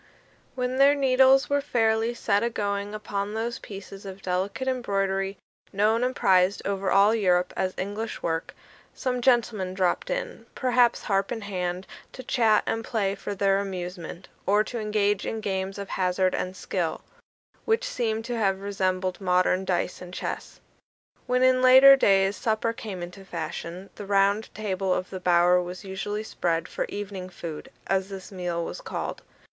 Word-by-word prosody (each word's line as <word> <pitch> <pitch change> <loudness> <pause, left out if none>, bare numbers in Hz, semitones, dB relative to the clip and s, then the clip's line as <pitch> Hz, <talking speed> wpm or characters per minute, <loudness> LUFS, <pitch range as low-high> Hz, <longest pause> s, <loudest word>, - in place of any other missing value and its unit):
When 250 0 -1
their 280 +1 +6
needles 265 0 +5
were 285 0 +1
fairly 225 -3 +1
set 205 -3 +1
a 235 - +1
going 205 -1 -2
upon 205 0 -3
those 230 +2 -2
pieces 195 -1 -9
of 195 -1 -9
delicate 190 +8 -2
embroidery, 195 -6 -1 0.3
known 215 +4 +2
and 255 0 0
prized 185 +1 +3
over 195 -1 -1
all 200 +3 +5
Europe 180 -5 +2
as 185 -1 -1
"English 205 +3 -4
work," 165 0 -2 0.4
some 250 -1 -2
gentlemen 225 -7 +2
dropped 185 - 0
in, - - -4
perhaps 245 -2 +2
harp 195 -1 0
in 230 - -3
hand, 185 -2 -3 0.3
to 260 - -8
chat 225 -5 +3
and 225 - -1
play 205 -5 -1
for 205 0 -5
their 195 0 +2
amusement, 180 -2 -6 0.2
or 205 +2 +4
to 235 +2 -5
engage 210 -2 0
in 225 - -3
games 195 -2 -3
of 200 -1 -6
hazard 185 0 +1
and 185 +1 -3
skill, 175 -4 -2 0.6
which 450 +2 +2
seem 225 - -1
to 240 +1 -3
have 195 -4 +1
resembled 185 -2 -1
modern 185 0 +2
dice 180 0 -1
and 180 0 -9
chess. - - -5 0.7
When 250 +1 +2
in 255 0 +4
later 260 +2 +9
days 195 -5 +3
supper 230 -1 0
came 195 -6 -6
into 180 +3 -9
fashion, 175 +1 -6
the 205 - -9
round 200 +2 +2
table 195 -3 -2
of 185 - -4
the 190 - -5
bower 180 0 +4
was 180 +2 -7
usually 205 +2 -4
spread 165 -6 -1
for - - -3
Evening 195 -2 -6
food, 165 -4 -7 0.2
as 195 0 0
this 195 -1 -8
meal 175 -3 -3
was - - -6
called. - - -5
200 Hz, 165 wpm, -26 LUFS, 185-225 Hz, 0.7 s, later